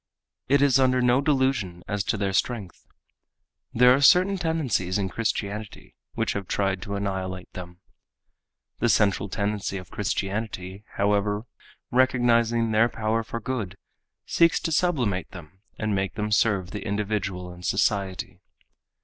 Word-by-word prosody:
It 140 Hz, +1 st, +4 dB
is 135 Hz, -2 st, +4 dB
under 130 Hz, -1 st, +3 dB
no 125 Hz, +1 st, +3 dB
delusion 130 Hz, -, 0 dB
as 105 Hz, -2 st, -1 dB
to 110 Hz, -, 0 dB
their 100 Hz, -1 st, -1 dB
strength. 100 Hz, -2 st, -2 dB, 0.8 s
There 125 Hz, +1 st, +6 dB
are 135 Hz, -, +2 dB
certain 185 Hz, +6 st, +6 dB
tendencies 150 Hz, -, 0 dB
in 100 Hz, -2 st, -1 dB
Christianity 105 Hz, -1 st, -4 dB, 0.2 s
which -, -, 0 dB
have 100 Hz, -2 st, -4 dB
tried 95 Hz, -2 st, 0 dB
to 100 Hz, +2 st, -4 dB
annihilate 95 Hz, -2 st, -4 dB
them. 90 Hz, 0 st, -9 dB, 1.0 s
The -, -, +2 dB
central 100 Hz, -1 st, +2 dB
tendency 100 Hz, 0 st, -2 dB
of 90 Hz, -1 st, -10 dB
Christianity, 100 Hz, -1 st, -3 dB
however, 105 Hz, +1 st, +1 dB, 0.5 s
recognizing 120 Hz, -2 st, +3 dB
their 110 Hz, +2 st, +4 dB
power 110 Hz, 0 st, -1 dB
for 115 Hz, +1 st, -5 dB
good, 110 Hz, -5 st, -4 dB, 0.5 s
seeks 170 Hz, 0 st, +3 dB
to 165 Hz, -, -2 dB
sublimate 130 Hz, -, 0 dB
them 90 Hz, +1 st, -12 dB, 0.2 s
and 110 Hz, -1 st, -1 dB
make 95 Hz, -1 st, -1 dB
them 105 Hz, 0 st, -2 dB
serve 100 Hz, -4 st, +2 dB
the 105 Hz, -2 st, -5 dB
individual 100 Hz, -3 st, -2 dB
and 90 Hz, 0 st, -13 dB
society. 95 Hz, -2 st, -1 dB
105 Hz, 140 wpm, -25 LUFS, 95-120 Hz, 1.0 s, There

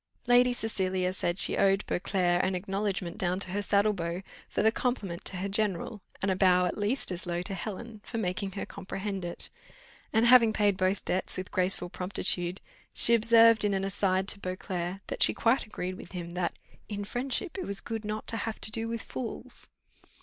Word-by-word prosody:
Lady 245 Hz, +1 st, +5 dB
Cecilia 190 Hz, -6 st, -1 dB
said 175 Hz, -1 st, -1 dB
she -, -, +4 dB
owed 195 Hz, +1 st, +3 dB
Beauclerc 180 Hz, -2 st, +1 dB
an 185 Hz, 0 st, 0 dB
acknowledgment 195 Hz, -1 st, -3 dB
down 180 Hz, 0 st, +1 dB
to 185 Hz, -, -3 dB
her 205 Hz, +2 st, -1 dB
saddle 205 Hz, +1 st, +2 dB
bow, 170 Hz, 0 st, -4 dB, 0.3 s
for -, -, 0 dB
the 220 Hz, -, +5 dB
compliment 215 Hz, -8 st, -2 dB
to 185 Hz, -, +2 dB
her 190 Hz, +2 st, -2 dB
general, 205 Hz, +1 st, 0 dB, 0.2 s
and 195 Hz, -, +2 dB
a -, -, +1 dB
bow 180 Hz, -1 st, +4 dB
at 180 Hz, -, -1 dB
least 210 Hz, +2 st, +1 dB
as 180 Hz, 0 st, -5 dB
low 175 Hz, 0 st, -2 dB
to 195 Hz, -, -5 dB
Helen, 215 Hz, +3 st, -6 dB
for 230 Hz, -, -6 dB
making 195 Hz, -1 st, -2 dB
her 195 Hz, -, -4 dB
comprehend 195 Hz, 0 st, -5 dB
it; 175 Hz, 0 st, -4 dB, 0.6 s
and, 225 Hz, +1 st, +3 dB
having 235 Hz, -2 st, +7 dB
paid 205 Hz, -2 st, +2 dB
both 185 Hz, +1 st, 0 dB
debts 185 Hz, -, 0 dB
with 185 Hz, 0 st, -5 dB
graceful 180 Hz, -1 st, 0 dB
promptitude, 180 Hz, -1 st, -1 dB, 0.3 s
she 235 Hz, -, +7 dB
observed, 230 Hz, -1 st, +6 dB
in 205 Hz, -1 st, +2 dB
an 195 Hz, -, -1 dB
aside 195 Hz, -1 st, 0 dB
to 205 Hz, -, 0 dB
Beauclerc, 185 Hz, 0 st, -4 dB
that -, -, -5 dB
she -, -, +7 dB
quite 230 Hz, +1 st, +2 dB
agreed 185 Hz, -3 st, -4 dB
with -, -, -11 dB
him, 175 Hz, -2 st, -5 dB
that 175 Hz, 0 st, -2 dB, 0.3 s
"In 205 Hz, -1 st, -4 dB
friendship 260 Hz, -, -2 dB
it -, -, -3 dB
was 200 Hz, 0 st, -2 dB
good 225 Hz, -1 st, -5 dB
not 215 Hz, +1 st, -4 dB
to 225 Hz, -, +1 dB
have 225 Hz, 0 st, -4 dB
to 215 Hz, -, -1 dB
do 225 Hz, +1 st, -2 dB
with 230 Hz, 0 st, -4 dB
fools." 240 Hz, -3 st, -6 dB
195 Hz, 200 wpm, -29 LUFS, 185-220 Hz, 0.6 s, having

